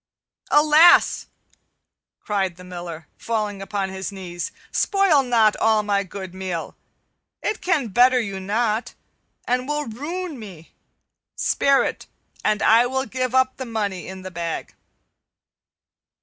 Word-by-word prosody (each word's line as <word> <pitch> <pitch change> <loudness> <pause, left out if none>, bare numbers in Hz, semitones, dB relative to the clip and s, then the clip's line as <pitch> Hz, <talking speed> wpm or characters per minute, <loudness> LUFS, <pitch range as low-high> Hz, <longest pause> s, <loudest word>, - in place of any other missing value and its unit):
"Alas!" 305 +3 +5 0.9
cried 195 -4 -1
the 180 - -13
Miller, 175 -3 -8
falling 210 -3 -2
upon 195 0 -3
his 190 0 -5
knees, 180 -3 -6 0.2
"spoil 390 -8 +3
not 230 -4 +3
all 220 -1 +3
my 200 -1 +1
good 190 -1 -8
meal! 185 -3 -5 0.7
It 425 - -2
can 300 -10 0
better 250 +5 +5
you 200 -4 -3
not, 215 +3 -1 0.5
and 250 +1 0
will 295 0 -1
ruin 305 +6 -5
me. 185 -7 -11 0.6
Spare 275 -1 +2
it, - - -4 0.4
and 215 -1 +1
I 230 +3 +5
will 265 +1 -1
give 255 -1 -2
up 260 0 +2
the 260 - -5
money 205 -5 -3
in 190 0 -8
the 185 - -7
bag." 170 -1 -4
215 Hz, 130 wpm, -22 LUFS, 190-260 Hz, 0.9 s, Alas